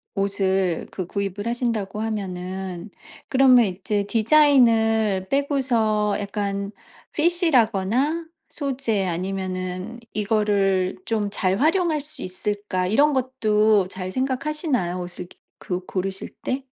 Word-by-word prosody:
옷을 195 -3 0
그 185 -3 -5
구입을 200 +1 -3
하신다고 230 -4 -2
하면은. 190 -3 -4 0.4
그러면 255 -3 +6
이제 200 +2 -2
디자인을 225 -6 +4
빼고서 235 -7 +1
약간 200 0 -3 0.4
fit이라거나 300 - +2 0.2
소재 260 -8 -1
아니면은 185 +3 -4
'이거를 200 -3 +1
좀 215 -3 -1
잘 190 -1 0
활용할 325 +1 +2
수 300 +2 -7
있을까.' 185 0 -2
이런 285 +9 +4
것도 215 -6 +2
잘 185 -1 -6
생각하시나요? 260 - -1
옷을 175 0 -7 0.3
그 180 0 -4
고르실 190 0 -3
때? 265 +1 -2
210 Hz, 250 characters per minute, -23 LUFS, 190-255 Hz, 0.4 s, 그러면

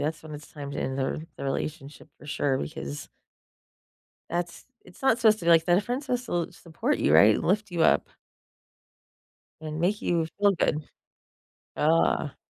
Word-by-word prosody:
That's 155 +2 -3
when 155 -1 -10
it's 150 0 -11
time 145 -2 -7
to - - -4
end 130 +1 -3
the 135 - +1
r - - -2 0.2
the - - -6
relationship, 145 +2 -5
for - - -14
sure, 140 -2 0
because 70 0 -6 1.2
that's 170 0 -4 0.2
It's 180 - -17
not 265 -4 +3
supposed 220 -2 +4
to 170 - -8
be 170 - +3
like 165 -1 +5
that. 175 0 +4
A 200 - +2
friend's 250 +6 -4
suppose 250 -1 -2
to - - -9
l 170 - -1
support 165 -2 -2
you, - - +3
right, 100 +7 +7
and - - -3
lift 205 +2 0
you 170 - 0
up - - +3 1.5
and 155 0 -5
make 195 +5 0
you 170 -2 +1
feel 205 0 +4
good. 155 -3 0 0.9
Ugh. 155 -2 +2
160 Hz, 185 wpm, -27 LUFS, 145-185 Hz, 1.5 s, right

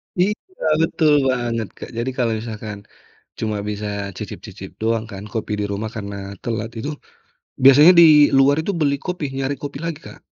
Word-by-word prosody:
Iya, 185 +4 +2 0.5
betul 155 -2 +2 0.2
banget, 120 -3 -1
Kak. - - -8
Jadi 120 +3 -1
kalau 120 -3 +1
misalkan 110 -2 -6 0.6
cuma 110 -1 -2
bisa 105 0 -4 0.3
cicip-cicip - - -8
doang 115 0 0
kan 100 0 -8
kopi 110 -1 -3
di 105 - -1
rumah 105 +2 -3
karena 100 -2 -5 0.3
telat 115 -1 -3
itu 140 - -4 0.7
biasanya 145 +6 +9
di - - +9 0.3
luar 135 +1 +5
itu 200 - -1
beli 140 -2 +2
kopi, 180 -4 -3
nyari 135 +1 -1
kopi 140 -1 -5
lagi, 165 -3 -4
Kak. - - -17
120 Hz, 160 wpm, -21 LUFS, 110-145 Hz, 0.7 s, biasanya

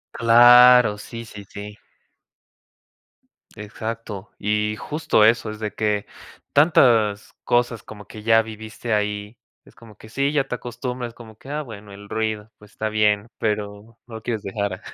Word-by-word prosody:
Claro, 120 -1 +7
sí, 115 +2 -8
sí, 105 -2 -11
sí. 105 +1 -9 1.8
Exacto 105 -1 -7
y 105 +1 0
justo 150 -7 +1
eso 110 0 +3
es 110 - -9
de 105 -1 -3
que, 105 -2 -1 0.5
tantas 115 -9 +3
cosas 120 -2 0
como 105 -2 -12
que 105 -1 -11
ya 115 0 +5
viviste 110 +1 -6
ahí, 105 +2 -2 0.3
es - - -21
como 110 -1 -16
que 110 - -15
sí, 140 +4 0
ya 140 -3 0
te 125 - -3
acostumbras, 125 0 -6
como 110 -3 -14
que: 135 - -14
"Ah 150 +1 -3
bueno, 105 -6 -11
el 100 +1 -13
ruido, 110 -1 -3
pues 105 0 -18
está 110 - -3
bien", 105 0 +1
pero 105 +1 -4
no 115 - -10
lo 110 - -7
quieres 115 -4 -3
dejar. 100 0 -4
110 Hz, 155 wpm, -22 LUFS, 105-120 Hz, 1.8 s, Claro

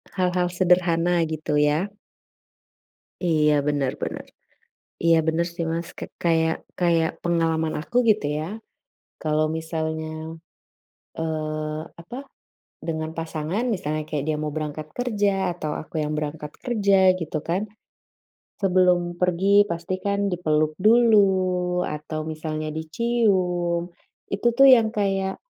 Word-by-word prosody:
Hal-hal 180 -1 +1
sederhana 175 -1 +3
gitu 155 -1 -2
ya. 150 +7 +2 1.3
Iya, 155 -3 +3
bener 140 -3 +1
bener. - - -4 0.8
Iya, 165 0 +5
bener 165 +2 +1
sih 170 -1 -2
Mas 165 +1 -3
k - - -7 0.2
kayak 160 -1 +1
kayak 165 -2 +3
pengalaman 165 -2 +1
aku 195 +9 -6
gitu 210 -8 +2
ya 175 +8 -5 0.6
kalo 155 0 +1 0.2
misalnya, 160 -1 -3 1.1
eee, 155 -1 -3 0.2
apa 230 +9 -8 0.7
dengan 160 -1 -2
pasangan, 165 +5 -3
misalnya 155 -4 -2
kayak 145 -3 -2
dia 155 - +1
mau 150 - -2
berangkat 155 0 -4
kerja, 205 -6 +1
atau 155 -3 -4
aku 155 - -14
yang 150 0 -2
berangkat 150 0 -4
kerja 200 -5 +3
gitu 155 -1 -3
kan. 180 +4 +1 1.0
Sebelum 180 -2 +4 0.2
pergi 190 +3 +4
pasti 170 +2 -3
kan 200 0 +1
dipeluk 155 -3 +1
dulu, 190 -5 +4
atau 155 0 -4
misalnya 155 0 -4
dicium, 180 -2 0 0.4
itu 200 +4 0
tuh 275 0 +8
yang 230 -2 +3
kayak, 195 -2 0
170 Hz, 120 wpm, -24 LUFS, 155-190 Hz, 1.3 s, tuh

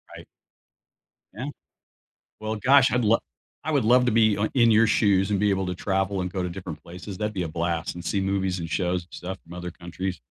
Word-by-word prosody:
Right. - - -11 1.1
Yeah, 115 +7 -5 0.9
well, 110 0 -3
gosh, 135 +4 +5
I'd 125 0 +1
lo 110 +2 +4 0.4
I 155 - -2
would 140 -6 +2
love 125 +2 +5
to 125 - +2
be 110 -2 +4 0.2
in 120 -3 +5
your 110 +1 +6
shoes, 100 -2 +3
and 100 - +1
be 105 - +3
able 95 -1 0
to 90 0 -3
travel 95 +1 -1
and 90 - -3
go 95 -1 -2
to 90 - -2
different 85 -4 -7
places. 90 +3 -8
That'd 105 +2 -2
be 95 -3 -2
a - - -3
blast, 85 +1 -2
and 85 - -7
see 100 - 0
movies, 95 -1 0
and 85 -1 -5
shows, 90 +2 0
and 85 - -23
stuff 95 +2 -6
from 85 - -13
other 90 0 -6
countries. 85 +1 -5
95 Hz, 220 wpm, -25 LUFS, 90-110 Hz, 1.1 s, your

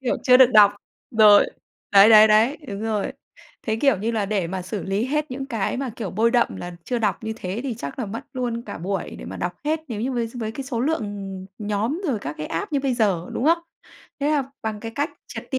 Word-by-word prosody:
Kiểu, 260 - 0
chưa 250 -1 +7
được 260 0 +8
đọc 205 -1 +7 0.4
rồi, 215 -3 +7 0.5
đấy, 200 +1 +8
đấy, 215 -1 +9
đấy. 225 +7 +4
Đúng 200 -1 -5
rồi. 215 -2 -1 0.5
Thế, 220 -1 -1
kiểu 275 0 +3
như 220 +4 -1
là, 220 -3 -1
để 195 -4 -1
mà 185 +2 -4
xử 195 +2 -5
lý 195 +3 -1
hết 300 +2 -1
những 270 +1 -5
cái 230 -5 -2
mà, 265 -1 -3
kiểu, 210 -6 -4
bôi 225 +4 +2
đậm 240 -1 +1
là 175 0 -7
chưa 245 - -1
đọc 210 -4 -1
như 220 - -2
thế, 190 +1 -4
thì 265 -4 -3
chắc 140 - -7
là 245 - -2
mất 225 +6 -5
luôn 245 -3 -3
cả 205 -6 -8
buổi 190 +1 -4
để - - -9
mà - - -7
đọc 175 0 -3
hết 310 +1 0
nếu 220 -4 -4
như 255 +4 -1
với 240 -2 -1
với 220 -2 -4
cái 270 +4 -6
số 250 -3 -3
lượng, 315 +6 0
ừm, 195 -2 -6 0.2
nhóm 220 - -1
rồi 255 -7 0
các 145 +2 -5
cái 150 - -4
app 165 - -4
như 285 - +1
bây 270 -2 0
giờ, 195 -7 +1
đúng - - -2
không? 330 +3 +4 0.6
Thế 290 - +1
là 280 -3 0
bằng 220 -1 -3
cái 225 +1 -6
cách 290 +5 -1 0.2
triệt - - -8
ti 265 - 0
225 Hz, 255 wpm, -23 LUFS, 200-255 Hz, 0.6 s, đấy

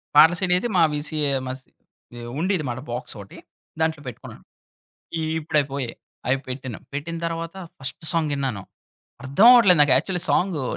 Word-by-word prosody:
పాటల 160 +3 +8
సీడీ 185 -2 +1
అయితే 240 +6 -2
మా 170 - +6
వీసీ 150 +1 -3 0.2
ఏమసి 130 0 -4 0.5
ఏహ్, 120 0 -7
ఉండేదిమాట 155 -9 -1
బాక్స్ 120 0 -5
ఓటి 100 - -13 0.4
దాంట్లో 160 -2 0
పెట్టుకున్నాను. 125 - -10 0.8
ఈ - - -2 0.2
ఇప్పుడు 155 0 -1
అయి 140 - -1
పోయాయి. 130 -4 -4 0.3
అవి 130 +2 +2
పెట్టాను. 130 -3 -6
పెట్టిన 160 +4 -4
తరువాత 165 0 -4 0.2
ఫస్ట్ 135 0 -4
ఫస్ట్ - - -7
సాంగిన్నాను. 140 -9 -1 0.6
అర్థం 140 +11 +3
అవ్వట్లేదు 200 -9 +7
నాకు 145 -3 +5
యాక్చువల్లి 180 +6 +1
సాంగు 175 -7 +1
150 Hz, 155 wpm, -23 LUFS, 130-165 Hz, 0.8 s, పాటల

